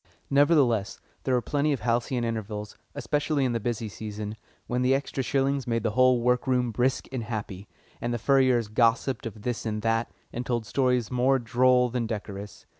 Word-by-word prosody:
Nevertheless, 140 Hz, -8 st, +3 dB, 0.3 s
there 130 Hz, -, +2 dB
were 120 Hz, -, 0 dB
plenty 145 Hz, +1 st, +1 dB
of 135 Hz, -, -4 dB
halcyon 120 Hz, +1 st, 0 dB
intervals, 105 Hz, -2 st, -4 dB, 0.2 s
especially 145 Hz, -1 st, 0 dB
in 125 Hz, -, +1 dB
the 115 Hz, -, 0 dB
busy 115 Hz, 0 st, -2 dB
season, 105 Hz, +1 st, -6 dB, 0.3 s
when 125 Hz, +1 st, -1 dB
the 130 Hz, +1 st, +3 dB
extra 135 Hz, 0 st, -2 dB
shillings 135 Hz, +1 st, 0 dB
made 115 Hz, -2 st, 0 dB
the 115 Hz, -, +1 dB
whole 130 Hz, +1 st, +4 dB
work 125 Hz, +1 st, +2 dB
room 125 Hz, -2 st, +1 dB
brisk 125 Hz, +4 st, 0 dB
and 130 Hz, -2 st, -3 dB
happy, 105 Hz, -3 st, -5 dB, 0.3 s
and 120 Hz, -, -1 dB
the 120 Hz, -, 0 dB
furriers 130 Hz, -2 st, +3 dB
gossiped 115 Hz, +3 st, +1 dB
of 110 Hz, -2 st, -10 dB
this 120 Hz, -1 st, -2 dB
and 105 Hz, -1 st, -3 dB
that, 115 Hz, 0 st, +1 dB, 0.2 s
and 120 Hz, -, -3 dB
told 120 Hz, -3 st, -2 dB
stories 125 Hz, -1 st, +1 dB
more 130 Hz, +2 st, +3 dB
droll 125 Hz, +1 st, +3 dB
than 120 Hz, -1 st, -2 dB
decorous. 105 Hz, -2 st, -6 dB
120 Hz, 185 wpm, -27 LUFS, 110-130 Hz, 0.3 s, whole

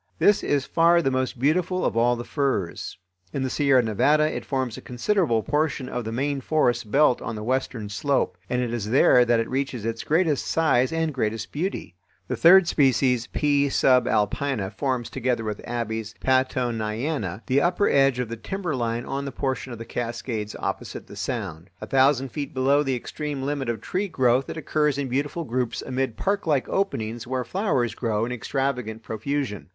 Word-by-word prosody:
This 205 Hz, -, +4 dB
is 140 Hz, -2 st, 0 dB
far 170 Hz, +1 st, +4 dB
the 135 Hz, -, +1 dB
most 130 Hz, -1 st, -1 dB
beautiful 175 Hz, +7 st, +1 dB
of -, -, 0 dB
all 120 Hz, +1 st, +3 dB
the 120 Hz, -, -5 dB
firs. 130 Hz, -, -2 dB, 0.4 s
In 135 Hz, -, -1 dB
the 130 Hz, -, -2 dB
Sierra 140 Hz, -4 st, +3 dB
Nevada 145 Hz, +8 st, +3 dB
it -, -, -4 dB
forms 130 Hz, -4 st, -2 dB
a -, -, -9 dB
considerable 125 Hz, -, 0 dB
portion 145 Hz, -2 st, -1 dB
of 120 Hz, -2 st, -4 dB
the 110 Hz, -, -3 dB
main 140 Hz, +3 st, -1 dB
forest 120 Hz, -6 st, +1 dB
belt 140 Hz, 0 st, +4 dB
on 115 Hz, -, -4 dB
the 105 Hz, -, -6 dB
western 125 Hz, -2 st, -2 dB
slope, 140 Hz, +7 st, 0 dB
and 125 Hz, 0 st, 0 dB
it 120 Hz, -1 st, -3 dB
is 110 Hz, -3 st, -3 dB
there 125 Hz, 0 st, +6 dB
that 120 Hz, -1 st, +2 dB
it 115 Hz, -, -1 dB
reaches 130 Hz, -4 st, -2 dB
its 115 Hz, 0 st, -3 dB
greatest 160 Hz, -2 st, +1 dB
size 145 Hz, -4 st, +2 dB
and 165 Hz, -1 st, -1 dB
greatest 110 Hz, -4 st, -2 dB
beauty. 165 Hz, -, -3 dB, 0.4 s
The -, -, 0 dB
third 180 Hz, +1 st, +7 dB
species 125 Hz, -5 st, +2 dB
(P. 145 Hz, -1 st, +1 dB
subalpina) 125 Hz, -3 st, +1 dB
forms, 125 Hz, +2 st, -1 dB
together 125 Hz, -3 st, -1 dB
with 105 Hz, -1 st, -4 dB
Abies 110 Hz, -2 st, -3 dB
Pattoniana, 120 Hz, -, -1 dB
the 135 Hz, +2 st, +2 dB
upper 180 Hz, +5 st, +2 dB
edge 135 Hz, -2 st, +3 dB
of 125 Hz, -1 st, -2 dB
the 115 Hz, +1 st, -6 dB
timberline 120 Hz, -, -3 dB
on 140 Hz, +1 st, -3 dB
the 140 Hz, -, -4 dB
portion 130 Hz, -1 st, -3 dB
of 120 Hz, -, -6 dB
the 115 Hz, -, -8 dB
Cascades 115 Hz, -3 st, -4 dB
opposite -, -, -4 dB
the -, -, -12 dB
Sound. 100 Hz, -, -4 dB
A -, -, -6 dB
thousand 135 Hz, +2 st, +3 dB
feet 145 Hz, +1 st, -5 dB
below 135 Hz, +3 st, +3 dB
the 135 Hz, -3 st, 0 dB
extreme 145 Hz, +2 st, -5 dB
limit 140 Hz, -2 st, -2 dB
of 115 Hz, -3 st, -3 dB
tree 190 Hz, +9 st, -2 dB
growth 130 Hz, -5 st, +2 dB
it -, -, -5 dB
occurs 150 Hz, -2 st, 0 dB
in 140 Hz, -2 st, -2 dB
beautiful 145 Hz, +6 st, -2 dB
groups 125 Hz, -3 st, -2 dB
amid 130 Hz, -3 st, -2 dB
parklike 170 Hz, -9 st, 0 dB
openings 120 Hz, -, -2 dB
where 130 Hz, 0 st, -1 dB
flowers 140 Hz, -, 0 dB
grow 115 Hz, -2 st, -1 dB
in 120 Hz, -, -5 dB
extravagant 125 Hz, -2 st, -2 dB
profusion. 110 Hz, -2 st, -3 dB
130 Hz, 180 wpm, -24 LUFS, 115-145 Hz, 0.4 s, third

